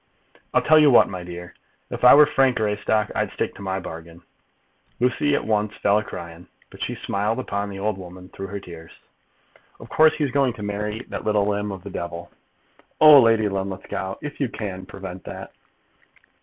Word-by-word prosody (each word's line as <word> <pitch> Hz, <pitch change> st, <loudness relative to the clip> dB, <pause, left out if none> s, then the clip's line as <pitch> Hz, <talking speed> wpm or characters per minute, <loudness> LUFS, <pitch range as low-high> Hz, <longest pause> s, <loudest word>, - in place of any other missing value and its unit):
"I'll -, -, +2 dB
tell 155 Hz, 0 st, +6 dB
you 150 Hz, -1 st, +6 dB
what, 125 Hz, -, +6 dB
my 90 Hz, -2 st, -6 dB
dear. 90 Hz, 0 st, -9 dB, 0.4 s
If -, -, -6 dB
I 125 Hz, -, +9 dB
were 150 Hz, +1 st, +8 dB
Frank 135 Hz, -3 st, +2 dB
Greystock, 105 Hz, 0 st, 0 dB
I'd -, -, -1 dB
stick -, -, -2 dB
to -, -, -13 dB
my 95 Hz, -1 st, -2 dB
bargain." 85 Hz, 0 st, -10 dB, 0.8 s
Lucy 130 Hz, +4 st, +1 dB
at -, -, -2 dB
once 105 Hz, -1 st, -1 dB
fell 100 Hz, +1 st, +2 dB
a -, -, -4 dB
crying, 85 Hz, -2 st, -9 dB, 0.2 s
but -, -, -14 dB
she -, -, -2 dB
smiled 105 Hz, +3 st, -2 dB
upon 100 Hz, -5 st, -3 dB
the 100 Hz, -, -7 dB
old 100 Hz, 0 st, -2 dB
woman 90 Hz, 0 st, -11 dB
through 95 Hz, -, -7 dB
her 100 Hz, +1 st, -6 dB
tears. 85 Hz, -3 st, -12 dB, 0.9 s
"Of -, -, -12 dB
course 155 Hz, 0 st, +4 dB
he's 145 Hz, -4 st, -1 dB
going 135 Hz, -2 st, +2 dB
to 105 Hz, -, -9 dB
marry 105 Hz, +2 st, -3 dB
that -, -, -5 dB
little 105 Hz, -1 st, +1 dB
limb 105 Hz, 0 st, -1 dB
of 95 Hz, -2 st, -8 dB
the 100 Hz, -, -8 dB
devil." 85 Hz, -1 st, -6 dB, 0.7 s
"Oh, 150 Hz, -3 st, +9 dB
Lady 115 Hz, -2 st, +3 dB
Linlithgow, 95 Hz, 0 st, -4 dB
if 150 Hz, 0 st, -6 dB
you 135 Hz, -, 0 dB
can, 95 Hz, -5 st, -6 dB
prevent 95 Hz, -2 st, -9 dB
that!" -, -, -8 dB
100 Hz, 190 wpm, -23 LUFS, 95-115 Hz, 0.9 s, I